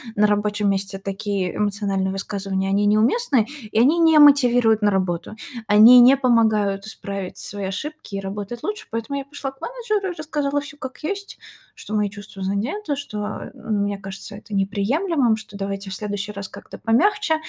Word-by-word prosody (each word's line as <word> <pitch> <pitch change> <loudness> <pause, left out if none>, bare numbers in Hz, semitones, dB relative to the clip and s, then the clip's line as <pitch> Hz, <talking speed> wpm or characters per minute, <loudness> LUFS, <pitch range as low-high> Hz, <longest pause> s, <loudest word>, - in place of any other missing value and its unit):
на 210 0 +4
рабочем 205 0 +1
месте 195 0 -1
такие 195 -2 -3
эмоциональные 200 -2 -1
высказывания, 195 0 -3
они 200 +1 +2
неуместны, 230 - +3 0.3
и 220 - +2
они 295 +8 +4
не 320 -1 +5
мотивируют 245 -6 +5
на 205 - +3
работу. 185 0 -2 0.3
Они 220 +4 +8
не 255 +3 +8
помогают 220 -6 +2
исправить 200 -3 -6
свои 200 -1 -6
ошибки 230 +4 -6
и - - -2
работать 205 +4 -6
лучше. 420 +1 -4
Поэтому 230 +5 -3
я 275 - -6
пошла 280 -1 -6
к 270 - -25
менеджеру 430 -6 -2
и - - -17
рассказала 290 -2 -1
всё 285 0 -10
как 260 -3 -8
есть, 400 +4 -4 0.4
что 215 - -8
мои 210 -1 +1
чувства 200 -1 -9
задеты, 265 - -2
что, 210 -7 -5
э, - - -10 0.2
мне 205 -1 0
кажется 195 +1 -8
это 210 0 -12
неприемлемым, 230 - +1
что 210 -2 -10
давайте 195 0 -4
в 190 - -4
следующий 205 0 -4
раз 200 -1 -6
как-то - - -11
помягче. 345 - +2
210 Hz, 170 wpm, -22 LUFS, 200-280 Hz, 0.4 s, Они